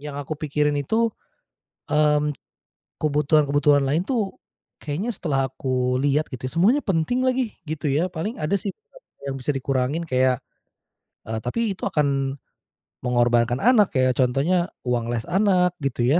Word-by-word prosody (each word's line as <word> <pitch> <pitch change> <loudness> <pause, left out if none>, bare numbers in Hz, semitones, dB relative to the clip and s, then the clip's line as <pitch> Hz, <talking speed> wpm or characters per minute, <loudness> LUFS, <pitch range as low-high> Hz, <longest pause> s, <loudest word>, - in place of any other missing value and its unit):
yang 145 -1 -6
aku 145 +2 -4
pikirin 150 -1 0
itu, 225 +9 +1 0.8
mmm, 150 0 +3 0.7
kebutuhan-kebutuhan 145 -1 +3
lain 155 +6 +1
tuh, 225 -7 -2 0.4
kayaknya 165 +11 -3
setelah 135 -8 -1
aku 130 -2 -1
lihat 145 +2 +1
gitu 130 0 -5
semuanya 200 - +3
penting 195 +7 0
lagi, 255 -3 0
gitu 155 -1 -3
ya, 155 +6 +2
paling 180 +8 -4
ada 155 +6 0
sih 200 +1 -3 0.6
yang 135 -1 -3
bisa 125 - -1
dikurangin 135 +3 -1
kayak, 130 -1 +2 0.9
eee, 110 0 -3
tapi 125 - -2
itu - - -17
akan 140 -2 0 0.7
mengorbankan 120 0 +2
anak, 220 -3 +4
kayak 130 -2 +2
contohnya 150 +8 +2 0.2
uang 120 -1 0
les 115 -2 -2
anak 180 -2 +3
gitu 130 -3 -1
ya. 155 +7 +4
150 Hz, 140 wpm, -23 LUFS, 130-180 Hz, 0.9 s, anak